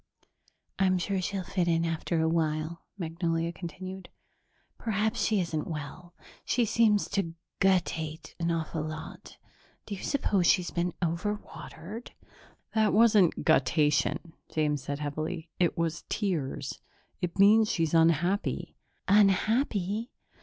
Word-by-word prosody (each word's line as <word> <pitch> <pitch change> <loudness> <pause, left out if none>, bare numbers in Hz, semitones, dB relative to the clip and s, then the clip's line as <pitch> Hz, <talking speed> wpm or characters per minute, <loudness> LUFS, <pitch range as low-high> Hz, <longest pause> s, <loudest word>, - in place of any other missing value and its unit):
"I'm 185 -1 +3
sure 190 +1 -1
she'll 195 +1 -2
fit 180 -1 -1
in 165 0 +2
after 165 0 -1
a 160 - +2
while," 160 0 -1 0.2
Magnolia 165 -1 -1
continued. 185 +2 -7 0.7
"Perhaps 220 -1 0
she 215 -2 +2
isn't 165 -4 -2
well. 165 +3 -7 0.3
She 240 -1 +1
seems 215 -2 +3
to 170 -5 -2 0.2
guttate 165 -5 0
an 170 0 0
awful 165 -1 -2
lot. 155 +1 -7 0.5
Do 210 - -6
you 195 - -6
suppose 200 - +1
she's 180 -3 +3
been 175 0 -1
overwatered?" 200 +3 -5 0.6
"That 220 -1 +3
wasn't 210 -5 +4
guttation," 150 +2 +2 0.2
James 150 -2 0
said 140 +1 -4
heavily. 155 +2 -4
"It 175 0 +2
was 165 -1 -1
tears. 175 -10 -2 0.4
It 175 -1 -3
means 210 +2 +6
she's 165 -2 0
unhappy." 170 +4 +2 0.3
"Unhappy? 210 +2 +2
175 Hz, 120 wpm, -29 LUFS, 160-200 Hz, 0.7 s, means